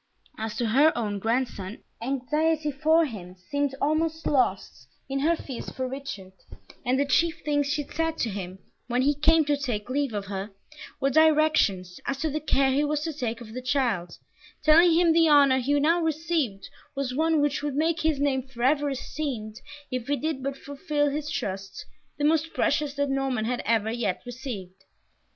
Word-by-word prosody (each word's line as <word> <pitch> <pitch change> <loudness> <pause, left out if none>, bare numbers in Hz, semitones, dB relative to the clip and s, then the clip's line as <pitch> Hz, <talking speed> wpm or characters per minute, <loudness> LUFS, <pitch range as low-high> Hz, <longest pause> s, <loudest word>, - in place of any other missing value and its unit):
As 220 -1 -4
to 235 -2 -1
her 285 +7 +5
own 205 -4 -2
grandson, 225 -3 -2 0.2
anxiety 300 +5 0
for 315 +4 +3
him 185 - -8
seemed 280 +9 -2
almost 320 +2 0
lost 195 - 0 0.2
in 275 +1 -2
her 325 +4 +3
fears 270 -6 -7
for 260 0 -4
Richard, 265 -8 -7 0.5
and 255 +2 +1
the 285 - +2
chief 325 +5 +1
things 290 -1 +1
she 295 +1 -1
said 325 +2 -2
to 230 - -1
him, 190 -2 -6 0.3
when 250 +1 +1
he 290 +2 +3
came 310 +2 +3
to 295 0 +2
take 250 -5 -3
leave 275 -4 -1
of 200 -1 -3
her, 195 +1 -5 0.5
were 275 0 +1
directions 305 - +3
as 275 - -1
to 310 +2 -1
the 305 - -1
care 275 -3 +2
he 280 +3 +2
was 295 0 0
to 320 +1 -3
take 240 -5 -3
of 220 -2 -10
the 255 - -5
child, 245 -10 -1 0.5
telling 330 +2 +6
him 335 -1 +4
the 330 -1 +5
honour 280 -3 +6
he 285 +3 +1
now 330 +4 +3
received 315 -10 -1 0.3
was 275 -2 -2
one 320 +3 +2
which 290 0 +1
would 290 -2 -3
make 320 +2 +1
his 310 -3 +1
name 280 -2 +1
forever 270 +4 +1
esteemed 255 -5 -5 0.3
if 255 -2 -3
he 285 - +1
did 310 -2 -2
but 275 +1 -3
fulfil 290 0 -1
his 295 +1 -3
trust, 195 -8 -4 0.3
the 290 - 0
most 320 +1 +1
precious 290 -1 +1
that 285 0 0
Norman 270 -5 0
had 245 +1 -1
ever 220 -1 +1
yet 225 -6 -2
received. 215 -7 -7
275 Hz, 180 wpm, -26 LUFS, 235-305 Hz, 0.5 s, telling